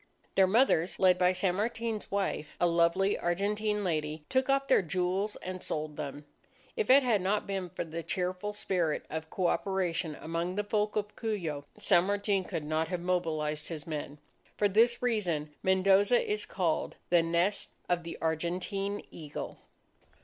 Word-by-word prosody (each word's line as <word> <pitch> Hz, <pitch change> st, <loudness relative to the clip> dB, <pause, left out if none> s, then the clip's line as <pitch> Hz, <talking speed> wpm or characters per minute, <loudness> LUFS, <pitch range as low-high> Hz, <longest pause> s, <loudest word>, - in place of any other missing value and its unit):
Their 190 Hz, -1 st, +5 dB
mothers, 190 Hz, -5 st, +3 dB
led 185 Hz, -1 st, +4 dB
by 180 Hz, 0 st, +5 dB
San 185 Hz, 0 st, +1 dB
Martin's 225 Hz, 0 st, -2 dB
wife, 195 Hz, -6 st, -2 dB
a -, -, +4 dB
lovely 170 Hz, +3 st, +3 dB
Argentine 210 Hz, +4 st, 0 dB
lady, 155 Hz, -3 st, -2 dB
took 260 Hz, 0 st, +1 dB
off 275 Hz, 0 st, +3 dB
their 265 Hz, -, +4 dB
jewels 185 Hz, +4 st, -1 dB
and 185 Hz, 0 st, -5 dB
sold 155 Hz, -1 st, -3 dB
them. 145 Hz, +1 st, -6 dB, 0.5 s
If 445 Hz, -3 st, -1 dB
it 270 Hz, +2 st, +8 dB
had 225 Hz, -6 st, +2 dB
not 200 Hz, +3 st, 0 dB
been 195 Hz, -3 st, -3 dB
for 180 Hz, -, -4 dB
the 165 Hz, +1 st, -5 dB
cheerful 180 Hz, +3 st, -2 dB
spirit 180 Hz, -6 st, -1 dB
of 160 Hz, 0 st, -4 dB
coöperation 180 Hz, -3 st, 0 dB
among 170 Hz, +3 st, -3 dB
the 210 Hz, -, 0 dB
folk 210 Hz, 0 st, 0 dB
of 210 Hz, -1 st, -2 dB
Cuyo, 170 Hz, -10 st, -3 dB
San 175 Hz, -, +4 dB
Martin 200 Hz, -1 st, +1 dB
could 165 Hz, -5 st, -4 dB
not 155 Hz, +1 st, 0 dB
have 180 Hz, 0 st, -2 dB
mobilized 155 Hz, -4 st, -1 dB
his 155 Hz, -4 st, -6 dB
men. 150 Hz, -2 st, -5 dB, 0.4 s
For 205 Hz, -, +4 dB
this 235 Hz, +5 st, +3 dB
reason, 175 Hz, -11 st, 0 dB
Mendoza 195 Hz, +4 st, +4 dB
is 210 Hz, 0 st, -2 dB
called 175 Hz, -5 st, -1 dB, 0.2 s
"The 175 Hz, -1 st, +6 dB
Nest 170 Hz, +5 st, 0 dB, 0.2 s
of 175 Hz, -1 st, +1 dB
the 170 Hz, 0 st, -7 dB
Argentine 180 Hz, +5 st, -2 dB
Eagle." 150 Hz, -3 st, -7 dB
185 Hz, 160 wpm, -30 LUFS, 165-205 Hz, 0.5 s, it